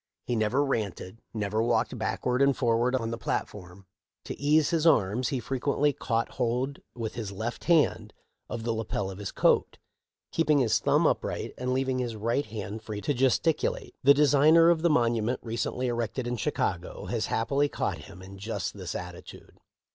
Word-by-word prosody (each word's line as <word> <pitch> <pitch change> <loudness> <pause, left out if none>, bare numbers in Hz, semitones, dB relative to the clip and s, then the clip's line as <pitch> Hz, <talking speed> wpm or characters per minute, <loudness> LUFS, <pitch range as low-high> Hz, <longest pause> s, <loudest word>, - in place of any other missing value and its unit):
He 120 - -1
never 115 +6 +1
ranted, 110 -4 -3
never 110 0 -1
walked 115 +2 +1
backward 125 +3 -1
and 140 -1 +4
forward 120 +1 +2
on 115 -3 -2
the 115 - -4
platform. 95 -1 -4 0.4
To - - -6
ease 150 +2 +3
his 165 -1 +2
arms 115 -3 +3
he 135 - -1
frequently 140 +3 0
caught 115 -3 -1
hold, 125 +3 -2 0.2
with 115 -2 -4
his 110 -4 -5
left 110 +4 -5
hand, 165 -3 +2 0.4
of 115 - -4
the 115 0 0
lapel 105 -3 -3
of 95 - -9
his 100 -2 -5
coat, - - +2 0.5
keep 165 -1 0
ing 150 - +6
his 125 -5 +3
thumb - - +2
upright - - -1
and 125 0 -3
leaving 130 0 0
his 120 -3 -3
right 115 +6 -1
hand 105 0 -6
free 105 -1 -6
to 145 - 0
gesticulate. 135 +5 +1
The 140 +1 +7
designer 150 +3 +6
of 165 -2 +1
the 170 - +3
monument 120 -3 +1
recently 120 +2 -2
erected 120 0 -2
in 120 0 -2
Chicago 110 - -2
has - - -2
happily 140 +5 +1
caught - - -2
him 90 +2 -12
in 95 +1 -11
just 100 -2 -3
this 90 -4 -6
attitude. 90 -1 -9
120 Hz, 175 wpm, -28 LUFS, 110-135 Hz, 0.5 s, The